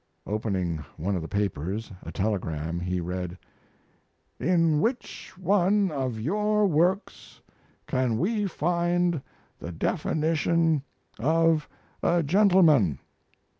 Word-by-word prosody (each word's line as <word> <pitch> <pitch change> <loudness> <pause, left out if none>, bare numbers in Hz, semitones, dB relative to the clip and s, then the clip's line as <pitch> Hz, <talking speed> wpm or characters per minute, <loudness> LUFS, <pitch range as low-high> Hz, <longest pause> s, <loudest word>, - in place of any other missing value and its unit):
Opening 95 -7 -2
one 95 +5 -1
of 90 - -2
the 80 - -6
papers, 100 +2 -2
a - - -8
telegram, 85 -5 -2
he 90 +1 -2
read: 90 +1 -4 1.0
"In 165 0 +3
which 240 +5 -3
one 195 +1 +2
of 130 -6 -2
your 210 - +1
works 180 +3 0 0.5
can 125 -3 0
we 205 - 0
find 175 -1 0 0.4
the 85 - -6
definition 160 - +1 0.4
of 160 +3 +2 0.3
a 170 0 +2
gentleman?" 160 - +4
150 Hz, 100 wpm, -26 LUFS, -, 1.0 s, gentleman